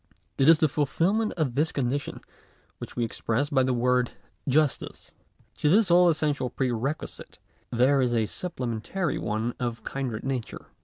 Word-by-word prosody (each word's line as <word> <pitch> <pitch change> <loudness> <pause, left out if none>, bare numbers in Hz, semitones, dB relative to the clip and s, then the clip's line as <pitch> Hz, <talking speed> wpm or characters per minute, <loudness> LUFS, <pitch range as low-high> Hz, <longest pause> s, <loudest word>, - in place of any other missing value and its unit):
It 135 +3 +5
is 165 - +8
the 155 - +3
fulfilment 170 +10 +1
of 155 -7 -1
this 155 +5 +1
condition 140 +1 -2 0.6
which - - -8
we 120 - 0
express 115 +5 -2
by 135 -2 +4
the 130 0 +1
word 125 0 +1 0.4
justice. 150 +1 0 0.4
To 150 - +2
this 195 +1 +4
all 175 0 +6
essential 150 -5 0
pre 130 0 -1
requisite 135 +7 -4 0.3
there 130 +3 +3
is 125 -2 +1
a 110 -1 +2
supplementary 150 - -3
one 110 +3 -2
of 120 -2 -4
kindred 130 -5 -4
nature. 130 -4 -4
135 Hz, 155 wpm, -26 LUFS, 120-155 Hz, 0.6 s, is